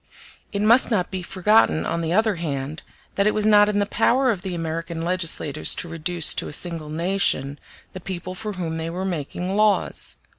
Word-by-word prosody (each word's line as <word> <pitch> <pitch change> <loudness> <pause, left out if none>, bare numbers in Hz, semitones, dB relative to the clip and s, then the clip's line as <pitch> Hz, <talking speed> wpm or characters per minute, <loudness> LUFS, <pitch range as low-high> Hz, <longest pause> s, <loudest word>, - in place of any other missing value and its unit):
It 200 0 -2
must 235 +4 +5
not 190 -7 0
be 190 -1 -3
forgotten, 190 0 +2
on 170 - -2
the 165 0 -2
other 215 0 +2
hand, 145 -2 -4 0.3
that 200 +1 +1
it 215 - +1
was 215 0 +1
not 210 -1 +6
in 205 - 0
the 205 - +2
power 250 +5 +2
of 195 -5 -4
the 185 -1 -4
American 165 0 -4
legislators 165 -4 0
to - - -4
reduce 165 +1 0
to - - -3
a - - -7
single 165 -2 -1
nation 155 -4 0 0.3
the 185 - -7
people 185 0 -6
for 210 +2 -5
whom 165 -3 -4
they 160 0 -4
were 180 +3 -4
making 180 +2 -3
laws. 210 -1 +1
180 Hz, 195 wpm, -23 LUFS, 165-205 Hz, 0.3 s, not